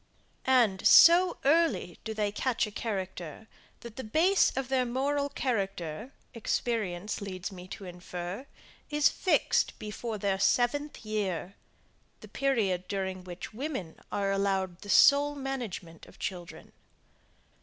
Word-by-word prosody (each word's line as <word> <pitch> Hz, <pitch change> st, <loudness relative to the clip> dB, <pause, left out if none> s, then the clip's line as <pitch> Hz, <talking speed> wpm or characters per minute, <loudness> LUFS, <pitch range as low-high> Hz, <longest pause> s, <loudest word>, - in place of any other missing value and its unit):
And, 230 Hz, -7 st, +4 dB
so 345 Hz, +2 st, +7 dB
early 315 Hz, -, +2 dB
do 220 Hz, -1 st, -5 dB
they 210 Hz, -1 st, 0 dB
catch 235 Hz, +4 st, 0 dB
a 210 Hz, -, -8 dB
character, 190 Hz, -3 st, -5 dB, 0.3 s
that 235 Hz, -1 st, -10 dB
the 260 Hz, -, -4 dB
base 335 Hz, -, +3 dB
of 270 Hz, -1 st, -1 dB
the 260 Hz, -1 st, +2 dB
moral 280 Hz, +4 st, -1 dB
character, 200 Hz, -, -3 dB, 0.2 s
experience 210 Hz, -5 st, -2 dB
leads 190 Hz, 0 st, -5 dB
me 180 Hz, -1 st, -10 dB
to 195 Hz, -, -8 dB
infer, 180 Hz, +6 st, -7 dB, 0.4 s
is 295 Hz, -1 st, +4 dB
fixed 370 Hz, -, +1 dB
before 215 Hz, +1 st, -5 dB
their 195 Hz, -1 st, -1 dB
seventh 255 Hz, +5 st, +1 dB
year, 195 Hz, -4 st, -2 dB, 0.7 s
the -, -, -11 dB
period 205 Hz, -10 st, 0 dB
during 190 Hz, -1 st, -3 dB
which 180 Hz, +3 st, -8 dB
women 245 Hz, -, -5 dB
are 200 Hz, -1 st, 0 dB
allowed 195 Hz, -2 st, -1 dB
the 205 Hz, -, -10 dB
sole 285 Hz, +6 st, +6 dB
management 240 Hz, -, -6 dB
of -, -, -17 dB
children. 180 Hz, -3 st, -6 dB
210 Hz, 130 wpm, -29 LUFS, 185-265 Hz, 0.7 s, so